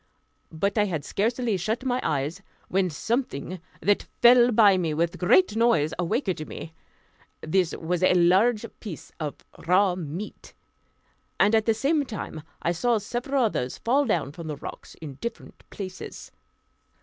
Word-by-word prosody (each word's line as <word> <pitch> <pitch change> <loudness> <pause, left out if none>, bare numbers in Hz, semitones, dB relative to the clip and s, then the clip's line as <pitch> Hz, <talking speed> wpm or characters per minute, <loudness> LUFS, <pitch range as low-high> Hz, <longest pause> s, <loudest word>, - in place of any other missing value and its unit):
But 200 +7 0
I 210 - +4
had 165 -7 -3
scarcely 230 0 0
shut 220 +8 -2
my 250 -1 +1
eyes 150 +5 -1 0.3
when 185 0 +1
something 185 - -3 0.2
that 205 +1 +1 0.2
fell 245 0 +7
by 210 -3 +6
me 165 -4 -1
with 170 +2 0
a - - -9
great 215 - +4
noise 225 -10 +3
awaked 185 - -1
me. 165 - -8 0.7
This 175 +1 +1
was 175 +2 -2
a 185 0 +4
large 195 +7 +4
piece 195 -9 -8
of 150 -3 -3 0.3
raw 185 +1 +4
meat; 175 +3 -7 0.8
and 210 - +4
at 220 0 +3
the 225 - +3
same 290 +6 +1
time 205 - -6 0.2
I 170 - +2
saw 235 +7 +1
several 245 +5 -1
others 130 - -1
fall 275 +5 +2
down 205 - 0
from 165 +1 -9
the 150 -2 -4
rocks - - -9
in 145 -4 -9
different 235 - -7
places. 185 -2 -8
195 Hz, 155 wpm, -26 LUFS, 165-235 Hz, 0.8 s, fell